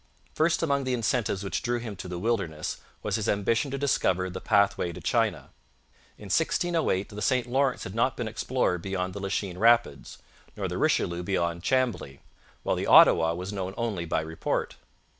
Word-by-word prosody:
First 165 +2 +1
among 140 -3 +1
the 130 -1 0
incentives 110 -3 -1
which 95 - -2
drew 120 0 -1
him 115 -3 -6
to 90 - -7
the 90 -1 -5
wilderness 90 -7 -2 0.3
was - - 0
his 110 - -2
ambition 110 +6 +1
to 140 - -3
discover 95 -9 +1
the 90 - -6
pathway 100 -3 +2
to - - -9
China. - - 0 0.7
In - - -14
1608 160 - +1
the 105 0 -8
St 125 +4 +1
Lawrence 130 +1 0
had 95 - -7
not 120 +4 +1
been 120 - -3
explored 110 -5 -1
beyond 95 0 -3
the 100 - -6
Lachine 95 -2 -3
Rapids, 115 - +2 0.4
nor - - -2
the - - -4
Richelieu 85 0 +1
beyond 85 -2 -1
Chambly 120 - -1 0.4
while - - 0
the - - -3
Ottawa 80 0 +6
was 90 +3 -5
known 95 -1 -4
only 105 -7 -2
by 80 - 0
report. 80 0 -3
100 Hz, 180 wpm, -27 LUFS, 90-120 Hz, 0.7 s, Ottawa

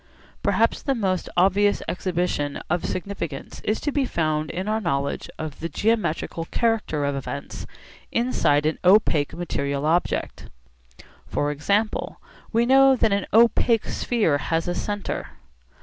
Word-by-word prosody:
Perhaps 230 +1 +2
the 275 - 0
most 190 -6 -1
obvious 200 +3 +3
exhibition 175 -5 -1
of 175 0 +1
significance 175 -6 -5
is 215 - 0
to 290 - -1
be 280 -1 +1
found 155 -9 -1
in 185 +4 -4
our 220 +1 0
knowledge 140 -6 -2
of 155 -2 -6
the 165 - -4
geometrical 170 -4 -1
character 215 -10 0
of 140 0 -1
events 140 +1 -6 0.4
inside 190 - +2
an 155 - 0
opaque 180 -6 +4
material 140 -4 -2
object. 170 +3 -1 0.8
For 145 0 -1
example 200 +9 -1 0.3
we 230 +1 +2
know 270 +1 +6
that 225 -4 +2
an 200 -1 -1
opaque 230 0 +4
sphere 205 -12 0
has 165 +4 -1
a 175 - 0
centre. 205 +2 -4
180 Hz, 135 wpm, -24 LUFS, 155-220 Hz, 0.8 s, know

